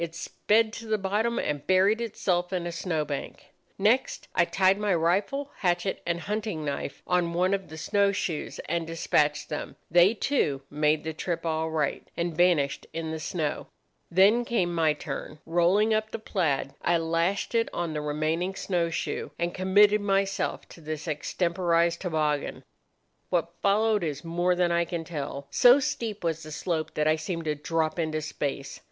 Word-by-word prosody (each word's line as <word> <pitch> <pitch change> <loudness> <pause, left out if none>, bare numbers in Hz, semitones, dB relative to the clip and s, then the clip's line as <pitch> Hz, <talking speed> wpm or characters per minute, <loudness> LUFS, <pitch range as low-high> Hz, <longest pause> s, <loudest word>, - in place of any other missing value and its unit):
It 170 -1 -4
sped 215 +5 +1
to 230 0 -8
the 215 0 +1
bottom 210 +4 0
and 145 -1 -2
buried 195 +5 +4
itself 180 -5 -1
in 180 -2 -2
a 175 - -3
snow 165 -3 -2
bank. 145 -2 -6 0.3
Next 230 +7 +1
I 170 - +4
tied 190 +2 +3
my 205 -3 +1
rifle, 200 - 0
hatchet, 175 +1 0
and 170 0 -1
hunting 210 -7 -3
knife 140 -1 -4
on 175 -2 +1
one 185 +2 +2
of 195 -1 -2
the 160 - -9
snow 200 +4 +2
shoes, 175 -5 -3
and 170 -1 -1
despatched 150 -2 +1
them. 150 - -5 0.2
They, 175 +6 +6
too, 150 - 0
made 150 +1 +2
the 160 +1 -3
trip 170 +1 -3
all 160 0 0
right, 155 -3 -1
and 170 -1 -1
vanished 165 -5 +2
in 165 -1 -3
the 160 - -4
snow. 155 -2 -3 0.4
Then 200 +7 +5
came 190 -8 0
my 160 -2 +3
turn. 150 - -6
Rolling 180 +6 +3
up 215 0 0
the - - -4
plaid 165 -11 -1
I 175 - +2
lashed 165 +6 0
it 230 -1 +2
on 170 -2 -3
the 150 - -2
remaining 155 +5 -1
snow 175 -4 0
shoe, 165 - -3
and 170 0 -1
committed 205 +3 +4
myself 195 -1 0
to 170 - -13
this 155 -1 -5
extemporized 170 +2 0
toboggan. 155 -5 -1 0.7
"What 170 -1 0
followed 210 0 +3
is 150 -3 -3
more 175 +2 +1
than 175 -1 +2
I 170 0 +3
can 170 -1 -4
tell. 140 -3 -5
So 245 - +7
steep 220 -7 -3
was 165 -1 -1
the 155 - -9
slope 160 0 -3
that 150 0 +1
I 155 0 +3
seemed 165 +1 -4
to 155 - +1
drop 160 +2 -1
into 155 -1 0
space. 140 -2 -4
170 Hz, 175 wpm, -27 LUFS, 160-195 Hz, 0.7 s, So